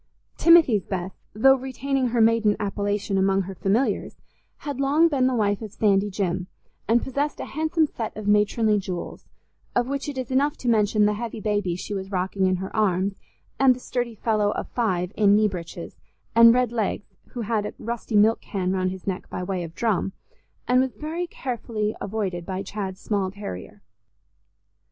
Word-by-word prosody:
Timothy's 320 - +5
Bess, 190 -1 -4 0.2
though 270 +5 +6
retaining 265 0 -1
her 235 -1 +1
maiden 220 -2 +4
appellation 205 -1 -1
among 195 0 +2
her 195 +1 -7
familiars, 200 +8 0 0.4
had 285 -3 -6
long 290 +5 +4
been 265 -4 +2
the 260 - +1
wife 205 -2 +1
of 215 -2 -7
Sandy 205 -1 +2
Jim, 185 -2 -2 0.4
and 235 +2 +3
possessed 285 +3 -2
a - - -4
handsome 315 +2 +1
set 230 -7 -6
of 215 -1 -5
matronly 210 +1 +3
jewels, 185 -2 -6 0.5
of 245 0 +2
which 280 +1 -3
it 280 - -6
is 255 -1 -4
enough 280 +3 +2
to 250 - -6
mention 215 -2 +3
the 210 - +2
heavy 230 +1 -5
baby 205 -4 -1
she 185 - -6
was 190 -1 -4
rocking 190 0 0
in 185 - +2
her 190 +1 -6
arms, 195 -2 +1 0.4
and 265 -2 +6
the - - -10
sturdy 245 -2 -3
fellow 210 -1 +1
of - - -4
five 185 -7 -1
in 205 -1 +5
knee 215 0 +4
breeches, 175 -3 -7 0.4
and 230 0 +8
red 250 -1 +2
legs, 220 -3 -2 0.2
who 245 - -4
had 215 -1 -1
a - - -7
rusty 230 -1 -4
milk 215 +2 +4
can 185 -3 -2
round 185 -1 0
his 185 0 -8
neck 190 -2 -4
by 180 - -4
way 185 -1 -2
of 165 0 -9
drum, 205 -4 0 0.5
and 250 +1 +4
was 265 -1 -2
very 330 +4 -4
carefully 230 -7 -3
avoided 195 -4 -3
by 190 +1 -4
Chad's 195 -2 -5
small 200 -3 -1
terrier. 105 - -8
210 Hz, 185 wpm, -24 LUFS, 195-245 Hz, 0.5 s, and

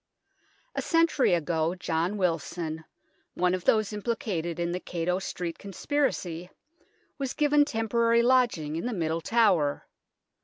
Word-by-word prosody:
A - - -2
century 330 - +3
ago 165 +1 0
John 175 +2 -1
Wilson, 165 -2 -2 0.5
one 180 0 +2
of 185 -1 -3
those 215 -1 +2
implicated 200 -6 -3
in 170 0 -1
the 180 - -2
Cato 180 +1 -2
Street 175 -3 -5
Conspiracy, 195 - -2 0.7
was 270 -2 -3
given 295 -1 +4
temporary 230 -1 +2
lodging 235 -12 +2
in 170 - -3
the 245 - -2
Middle 165 -3 -1
Tower. 190 -10 +2
180 Hz, 125 wpm, -27 LUFS, 165-235 Hz, 0.7 s, given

